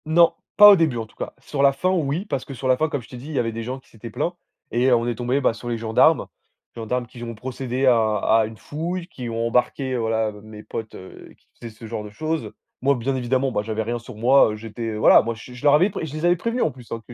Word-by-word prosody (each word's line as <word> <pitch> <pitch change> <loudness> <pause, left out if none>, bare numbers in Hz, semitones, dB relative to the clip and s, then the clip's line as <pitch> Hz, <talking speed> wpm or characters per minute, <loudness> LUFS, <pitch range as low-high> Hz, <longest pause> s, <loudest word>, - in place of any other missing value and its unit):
Non, 165 +2 +5 0.2
pas 205 0 +11
au - - +8
début 160 -9 +1
en 115 - -3
tout 110 - -23
cas. - - -6
Sur 140 - -4
la 140 0 +5
fin 180 +7 0
oui, 165 +1 -1
parce 135 -11 -3
que 140 - -8
sur 130 0 -4
la 130 -1 +4
fin 155 +3 0
comme 145 -2 -3
je 110 - -15
t'ai 125 - -9
dit, 125 +4 -10
il 155 - -6
y - - 0
avait 115 -1 0
des 115 +1 -5
gens 130 +3 -5
qui - - -27
s'étaient 115 +1 -10
plaints 170 +10 -2 0.4
et 120 +2 +2
heu, 125 - +6
on 115 0 0
est 120 - -1
tombés 125 +4 -1
bah, 120 - +2
sur 120 +2 -8
les 120 - -1
gendarmes. 110 0 +3 0.5
Gendarmes 120 +2 -2
qui 120 0 -13
ont 115 -1 -6
procédé 130 +2 -3
à 125 -2 +5 0.2
à 110 +1 +3
une 110 +1 -8
fouille, 170 - -5
qui 125 -9 -7
ont 115 0 -1
embarqué 125 +2 0
voilà 110 -1 0
mes 110 0 -11
potes, 110 -1 -7
heu, 95 - -12
qui - - -37
faisaient 115 -2 -8
ce 115 - -11
genre 110 -1 -5
de - - -8
choses. 155 +9 -3 0.3
Moi 140 +2 +3
bien 130 +2 -2
évidemment, 130 +1 0
ben 105 - 0
j'avais 110 +1 -3
rien 120 +2 -3
sur 115 0 -11
moi, 120 +2 +5
heu, - - -5
j'étais 115 +1 -5
voilà, 105 - +6
moi 115 +1 -3
je 110 +3 -12
je 125 - -12
leur 145 - +6
avais 180 +7 +4
pré 195 - -5
et - - -1
je 150 - -8
les 155 - -5
avais 175 0 +4
prévenu 230 +7 -2
en 155 - +2
plus, 125 -2 -15
hein, 115 - -5
que 120 - -10
125 Hz, 295 wpm, -23 LUFS, 115-140 Hz, 0.5 s, pas